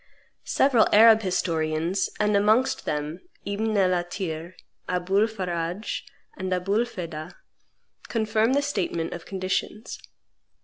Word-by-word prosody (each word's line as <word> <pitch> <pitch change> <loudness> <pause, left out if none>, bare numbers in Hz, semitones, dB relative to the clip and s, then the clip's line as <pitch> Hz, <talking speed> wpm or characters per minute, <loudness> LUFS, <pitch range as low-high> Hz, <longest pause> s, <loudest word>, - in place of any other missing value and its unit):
Several 260 -5 +4
Arab 220 +1 +7
historians, 165 -1 0
and 210 -1 +2
amongst 215 +6 +2
them 150 +3 -3 0.3
Ibn 215 +2 -1
el 185 -2 +3
Athir, 175 -1 -4 0.3
Aboul 190 +4 +2
Faradje, 180 -2 -3 0.3
and 185 -1 -4
Aboul 195 +6 +1
Feda 170 -7 -7 0.7
confirm 220 +1 +1
the 285 +1 +2
statement 180 - -2
of 170 - -9
conditions. 190 +3 -3
190 Hz, 105 wpm, -25 LUFS, 175-215 Hz, 0.7 s, Arab